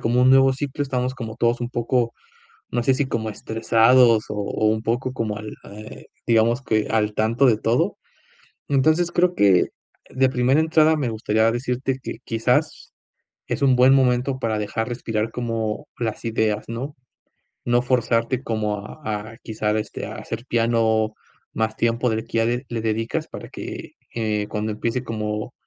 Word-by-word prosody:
como 120 +2 +2
un 130 - +6
nuevo 135 0 +6
ciclo, 145 +1 -3
estamos 130 -2 -1
como 115 -3 -7
todos 120 0 +1
un 120 - -2
poco, 120 0 0 0.6
no 120 - 0
sé, 130 +2 +3
si 135 +1 0
como 110 -3 -2
estresados 115 +2 +4
o - - -2
o 105 +1 -1
un 110 0 +1
poco 120 +3 -1
como 110 -4 -3
al 105 0 -7 0.2
eh, 105 +1 -11 0.2
digamos 115 +2 +3
que 110 -3 0
al 105 -1 +1
tanto 115 +6 +2
de 115 -4 +4
todo. 115 +2 0 0.7
Entonces 155 +5 +3
creo 180 0 +2
que 95 -3 +4 0.4
de 130 0 +2
primera 130 +3 +2
entrada 160 0 +4
me 140 -5 -1
gustaría 110 0 +1
decirte 130 +2 -2
que - - -6
quizás 115 0 0 0.6
es - - -3
un 130 -2 +4
buen 130 +2 +6
momento 130 0 +2
para 115 -4 -1
dejar 110 +2 -2
respirar 115 -2 -2
como 115 -3 -3
las 115 -1 -3
ideas, 110 -2 0
¿no? 130 +6 -5 0.7
No 120 0 +3
forzarte 125 0 0
como 110 -2 -1
a 155 - -11 0.3
a 115 - -13
quizá 110 -1 -2
este - - -5
a - - -7
hacer 115 +2 -6
piano 115 -2 +2 0.4
más 110 0 -1
tiempo 115 +1 +1
del 110 0 -2
que - - -4
ya 115 - +3
de 120 +3 -1
le 115 -2 -3
dedicas 115 +1 -2
para - - -9
que, - - -8 0.2
eh, 105 -2 -1
cuando 110 0 -2
empiece 115 +4 -2
como 105 -2 -4
115 Hz, 170 wpm, -22 LUFS, 110-130 Hz, 0.7 s, un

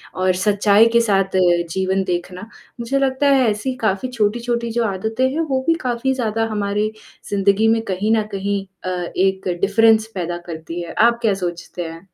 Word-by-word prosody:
और 185 0 +1
सच्चाई 205 +1 +4
के 235 - +6
साथ 195 -3 +1 0.4
जीवन 190 +1 0
देखना, 180 0 -4 0.4
मुझे 250 +4 -1
लगता 270 +1 +1
है 265 -4 +4
ऐसी 215 +5 -2
काफ़ी 215 +3 0
छोटी-छोटी 235 +1 -1
जो 235 +1 0
आदतें 220 +6 -1
हैं, 315 - -2
वो 265 -4 -1
भी 330 - +5
काफ़ी 250 +1 -1
ज़्यादा 225 -3 -1
हमारी 210 +1 -1 0.4
ज़िंदगी 200 +2 +2
में 225 0 +3
कहीं 200 +4 0
न 215 - +1
कहीं 200 0 -2 0.2
अ, 185 - -3 0.3
एक 190 0 +1
डिफ़रेंस 220 +2 +4
पैदा 175 -1 -3
करती 165 +1 -6
है। 170 - -7
आप 235 +1 +4
क्या 215 - +3
सोचते 175 0 -5
हैं? 165 +4 -12
210 Hz, 175 wpm, -20 LUFS, 190-235 Hz, 0.4 s, के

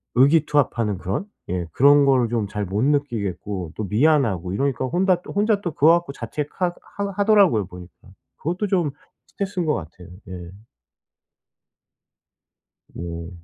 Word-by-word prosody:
의기투합하는 140 - +3
그런? 100 - -3 0.2
예 90 -2 -2
그런 145 +1 +6
거를 130 -3 +3
좀 115 -3 -1
잘 105 0 -3
못 100 +5 -1
느끼겠고 105 - -1
또 110 - -2
미안하고 110 - +2
이러니까 135 +3 0
혼다 180 +4 +1
또 - - -9
혼자 205 0 +2
또 175 - -3
그거 155 +5 +5
갖고 170 -4 0
자책하 150 +9 -3 0.2
하 200 0 -2
하더라고요, 200 - +4
보니까. 90 +2 -13 0.3
그것도 180 +7 -2
좀 175 -6 +1 0.4
스트레스인 190 -3 -3
거 150 - +2
같아요. 90 +2 -9 0.2
예. 90 -1 -8 2.4
네. 85 0 -7
135 Hz, 295 characters per minute, -22 LUFS, -, 2.4 s, 그런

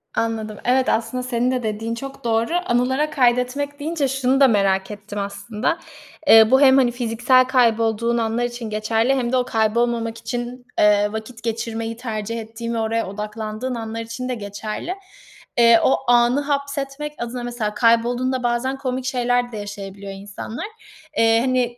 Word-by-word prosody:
Anladım. 220 -2 -2
Evet, 255 +1 +3
aslında 230 +3 -1
senin 250 0 0
de 255 -1 -1
dediğin 225 +1 -3
çok 275 +1 -8
doğru. 230 +4 0
"Anılara 260 +4 +1
kaydetmek." 260 +3 +1
deyince 300 -2 -1
şunu 270 0 +1
da 275 - +7
merak 195 -2 +1
ettim 205 0 -7
aslında. 200 +8 -2 0.5
Eee, 225 -3 +8
bu 265 +2 +6
hem, 265 -1 +7
hani, 250 -3 +4
fiziksel 245 +2 +3
kaybolduğun 230 -2 +2
anlar 230 +1 0
için 240 -2 -4
geçerli 225 +4 +1
hem 245 -2 -1
de 260 - +3
o 250 - +1
kaybolmamak 230 0 0
için, 240 +2 -5
eee, 205 0 +4
vakit 220 +1 -7
geçirmeyi 230 0 -3
tercih 230 -2 -4
ettiğin 230 +1 -6
ve - - -2
oraya 225 -1 -1
odaklandığın 215 +4 -5
anlar 225 0 -5
için 230 +3 -5
de 250 - -1
geçerli. 215 - -5 0.6
Eee, 230 -1 +7
o - - +4
anı 245 +3 +4
hapsetmek 280 0 -3
adına 240 +1 -5
mesela 235 -3 -3
kaybolduğunda 245 +2 +2
bazen 240 +3 0
komik 255 -1 -3
şeyler 245 -1 0
de 220 - -6
yaşayabiliyor 200 -1 -7
insanlar. 200 - -7 0.5
Eee, 225 0 +4
hani, 250 -2 0
235 Hz, 155 wpm, -21 LUFS, 220-255 Hz, 0.6 s, Eee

